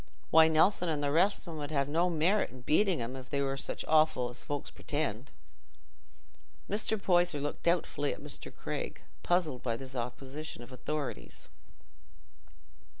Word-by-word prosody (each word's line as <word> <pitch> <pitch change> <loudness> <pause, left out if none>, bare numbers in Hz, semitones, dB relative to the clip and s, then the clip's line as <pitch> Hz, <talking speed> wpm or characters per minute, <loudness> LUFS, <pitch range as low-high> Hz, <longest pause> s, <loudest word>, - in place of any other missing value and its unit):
Why, 160 0 +8
Nelson 170 +3 +3
and 150 -2 -1
the 140 - +1
rest 185 +8 +3
of 170 - -7
'em 155 - -6
'ud 145 -1 -4
have 140 -3 +1
no 170 +5 +2
merit 175 +5 +2
i' - - -12
beating 160 - +2
'em, 120 +3 -5
if 130 -1 -9
they 140 - -1
were 135 -1 0
such 135 - -2
offal 155 -6 +3
as 120 - -5
folks 145 -1 -4
pretend." 140 -4 -3 1.4
Mr. 215 +1 0
Poyser 175 -5 +2
looked 145 +1 -4
doubtfully 165 -4 +1
at - - -6
Mr. 145 -1 -6
Craig, - - -5 0.2
puzzled 165 -8 +1
by 115 -2 -1
this 130 +1 -8
opposition 130 +3 -5
of 120 - -13
authorities. 130 - -5
150 Hz, 160 wpm, -31 LUFS, 135-170 Hz, 1.4 s, Why